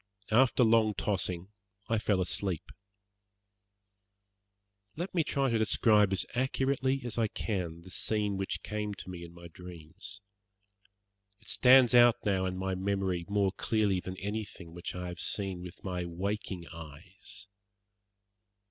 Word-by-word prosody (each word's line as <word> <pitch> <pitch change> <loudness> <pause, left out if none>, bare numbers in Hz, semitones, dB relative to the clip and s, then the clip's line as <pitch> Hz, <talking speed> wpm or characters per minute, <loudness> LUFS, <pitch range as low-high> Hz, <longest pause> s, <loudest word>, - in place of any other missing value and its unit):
After 125 +2 +5
long 110 -2 +4
tossing 95 -3 -1 0.4
I 115 -1 +1
fell 100 -3 +1
asleep. 90 -2 -2 2.2
Let 175 +4 -4
me 170 -3 +3
try 140 -3 0
to 115 - +2
describe 105 -2 +4
as 95 - 0
accurately 130 +1 0
as 120 -2 -2
I 115 - +3
can 90 -6 -3
the 95 +2 -13
scene 105 -1 0
which 95 0 -3
came 105 -1 -3
to 95 - -8
me 85 -1 -7
in 85 - -10
my 85 0 -11
dreams. 85 -2 -10 1.2
It - - -12
stands 125 -1 +6
out 120 -1 +8
now 95 -2 +1
in 90 0 -3
my 95 0 -1
memory 95 -2 -1
more 100 -1 +2
clearly 105 -2 +1
than 95 +1 -6
anything 100 -4 -5
which 85 +1 -6
I 90 0 -4
have 90 -1 -7
seen 95 -3 -1
with 90 0 -10
my 90 -2 -2
waking 95 +1 -3
eyes. 85 +7 -10
100 Hz, 140 wpm, -31 LUFS, 90-110 Hz, 2.2 s, out